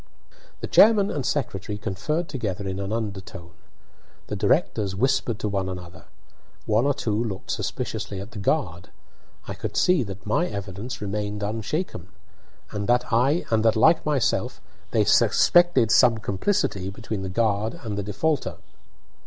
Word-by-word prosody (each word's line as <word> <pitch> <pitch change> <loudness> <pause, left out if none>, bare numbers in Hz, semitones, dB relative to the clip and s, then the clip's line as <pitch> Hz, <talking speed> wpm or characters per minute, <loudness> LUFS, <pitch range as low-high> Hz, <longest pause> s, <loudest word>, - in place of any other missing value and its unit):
The - - -3
chairman 210 -2 +5
and 145 - -2
secretary 105 -7 -2
conferred 150 - -2
together 100 - -4
in 95 0 -3
an 100 +1 -4
undertone. 95 -5 -5 0.8
The - - -2
directors 100 -3 +1
whispered 125 0 +1
to 105 - -3
one 100 -2 -1
another. 90 -1 -9 0.6
One 110 +5 +2
or 145 - +2
two 110 -4 -1
looked 100 -5 -5
suspiciously 100 - -3
at 100 +4 -8
the 110 - -8
guard. 95 - -1 0.6
I - - -4
could - - -5
see 180 -4 +4
that 100 -4 -7
my 110 +12 +1
evidence 100 - -6
remained 105 0 -3
unshaken, 110 - -3 0.6
and 105 -2 -3
that, 120 -1 +2
like 160 +9 +5
myself, 145 -5 0 0.3
they - - +2
suspected 175 -10 +4
some 120 -3 +5
complicity 100 - -1
between 105 0 -5
the 95 - -4
guard 110 +1 0
and 105 -3 -4
the 100 - -2
defaulter. 135 +10 -1
110 Hz, 140 wpm, -24 LUFS, 100-130 Hz, 0.8 s, chairman